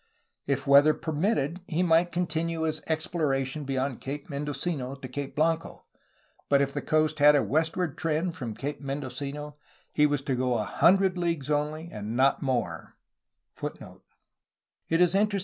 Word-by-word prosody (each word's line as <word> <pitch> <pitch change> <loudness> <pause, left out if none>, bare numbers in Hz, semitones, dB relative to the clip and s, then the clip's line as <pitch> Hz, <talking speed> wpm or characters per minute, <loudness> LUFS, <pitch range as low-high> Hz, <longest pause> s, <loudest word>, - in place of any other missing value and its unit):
If 140 -1 0
weather 145 +2 +6
permitted 165 0 -1
he 170 +2 0
might 170 0 +3
continue 165 -1 -1
his 155 -1 -1
explorations 150 -3 -1
beyond 135 -2 -2
Cape 145 +3 -6
Mendocino 140 -1 -3
to 135 -1 -8
Cape 140 +2 -6
Blanco,^ 165 +2 0 0.7
but 140 - +5
if 140 0 0
the - - -2
coast 155 0 +1
had 145 +1 +7
a 145 - +3
westward 160 +1 -1
trend 165 +1 -1
from 115 -4 -5
Cape 145 +5 -5
Mendocino 140 +2 -5 0.4
he 150 0 +4
was 145 -2 -1
to 135 -2 -1
go 125 -1 +1
a 105 - 0
hundred 185 - +3
leagues 165 -5 -1
only 150 +2 -1
and 105 +2 -5
not 135 +1 +3
more. 130 -3 -2
150 Hz, 140 wpm, -27 LUFS, 135-160 Hz, 0.7 s, had